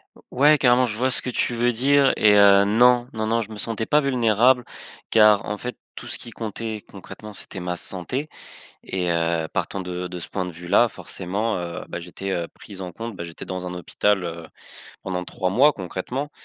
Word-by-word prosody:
O - - -18
Ouais, 150 +4 +5
carrément, 125 -1 +4
je 105 -1 -4
vois 130 +2 +1
ce - - +3
que 125 - -4
tu 120 0 -1
veux 120 +1 +2
dire 135 +3 +4
et 105 -1 +5
heu, 100 0 +7
non. 120 +3 +4
Non, 110 0 -2
non, 115 +1 +1
je 110 - -7
me 105 - -8
sentais 110 0 -3
pas 150 0 +3
vulnérable 125 -1 +3 0.4
car 105 -2 +5
en 105 0 -3
fait, 125 +3 -6 0.2
tout - - -8
ce - - -2
qui 115 - -9
comptait, 110 -1 -5
concrètement, 105 +2 -10
c'était 95 - -7
ma 90 0 -3
santé 110 - -3 0.6
et 90 -2 -2
heu, 85 -1 0
partant 95 - -2
de 90 0 -4
de 90 0 -7
ce - - -7
point 95 -2 -3
de - - -5
vue-là, 90 +8 +2
forcément, 100 +4 -3
heu, 85 -1 -5
bah, 85 - -5
j'étais 90 0 -4
pris 100 -2 -12
en 90 -1 -5
compte 115 -3 -7
bah, 85 - -6
j'étais 85 -1 -9
dans 90 -1 -5
un 90 - -5
hôpital, 95 +2 0
heu, 85 -1 -6 0.6
pendant 90 -2 -3
3 90 +1 -2
mois, 135 +10 +5
concrètement. 125 - -5
105 Hz, 210 wpm, -23 LUFS, 90-120 Hz, 0.6 s, heu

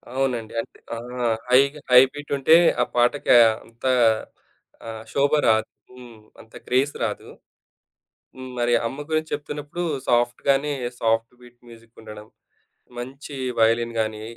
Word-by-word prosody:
అవునండి. 125 -5 -2
అంటే - - -16 0.2
ఆ! - - -6 0.5
హైగా, 140 +4 +3
హై 125 0 +9
బీటుంటే, 145 +1 +2 0.3
ఆ - - +4
పాటకి 120 +4 +2 0.3
అంతా 120 +3 -3 1.0
ఆహ్, 110 -1 -7
శోభ 140 0 +2 0.2
రాదు 110 -1 +2 0.2
హ్మ్. 125 -2 -14 0.2
అంత 110 - -21
గ్రేస్ 135 +3 +1
రాదు. 105 -2 -4 1.1
హ్మ్. 130 0 -9
మరి 120 0 +1
అమ్మ 140 +5 -7
గురించి 155 0 -1
చెప్తున్నప్పుడు 150 +3 -5 0.2
సాఫ్ట్‌గానే 135 +4 +1 0.3
సాఫ్ట్ 115 +1 0
బీట్ 120 0 -18
మ్యూజికుండడం. 115 -2 -13 0.7
మంచి 135 +4 -8 0.2
వైలిన్ 115 +1 +2
గానీ, 110 -1 -3
125 Hz, 115 wpm, -23 LUFS, 115-140 Hz, 1.1 s, హై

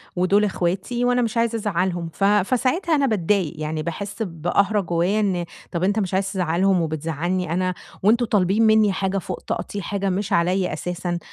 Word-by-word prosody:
ودُول 190 +3 +3
إخواتي 195 +6 -1
وأنا 245 0 +2
مش 230 -1 -1
عايز 230 0 +1
ازعّلهم"، 180 -5 -1
ف 195 - -4
فساعتها 255 - +2
أنا 280 -2 +2
باتضايق 200 - +1
يعني 155 0 -3
باحس 200 +5 -5
بقهرة 195 +4 0
جوّايا 175 +4 0
إن 185 -5 0 0.3
طَب 170 -1 -2
أنت 205 +3 +2
مش 190 -2 -2
عايز 195 +1 0
تزعلهم 180 0 +1
وبتزعلني 165 +3 -2
أنا 185 +1 0 0.3
وأنتم 230 +4 +4
طالبين 205 0 +2
منّي 215 -2 +4
حاجة 195 +1 -1
فوق 185 - -4
طاقتي، 200 +3 -4
حاجة 195 +1 -2
مش 195 +2 -2
عليَّ 180 +1 +1
أساسًا، 175 +2 -3
190 Hz, 170 wpm, -22 LUFS, 175-210 Hz, 0.3 s, وأنتم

